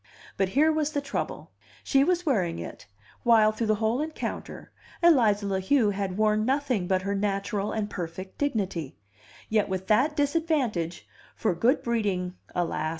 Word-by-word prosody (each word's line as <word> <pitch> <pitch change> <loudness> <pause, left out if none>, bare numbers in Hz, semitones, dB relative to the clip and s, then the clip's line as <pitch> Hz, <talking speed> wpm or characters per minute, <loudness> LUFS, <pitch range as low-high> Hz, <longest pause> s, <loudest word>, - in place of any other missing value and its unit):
But 195 -1 +1
here 310 +2 +5
was 310 -1 -1
the 285 - +1
trouble: 280 -1 -4 0.3
she 270 0 +3
was 355 +3 +1
wearing 195 - +1
it; 85 +4 -8 0.3
while, 220 -2 +5
through 220 +1 -2
the 215 - +3
whole 220 +5 0
encounter, 310 +1 -5 0.3
Eliza 225 -11 +5
La 195 -1 0
Heu 215 +2 +3
had 195 -2 -3
worn 215 0 +2
nothing 255 -6 0
but 185 0 +1
her 200 +1 -1
natural 200 0 -1
and 215 -2 -2
perfect 185 0 -7
dignity; 195 - -2 0.5
yet 215 -2 +1
with 190 0 -3
that 260 +8 +3
disadvantage 285 - 0 0.3
(for 215 - 0
good 235 - +2
breeding, 200 -6 -1 0.2
alas! 165 -3 -1
215 Hz, 155 wpm, -27 LUFS, 190-275 Hz, 0.5 s, here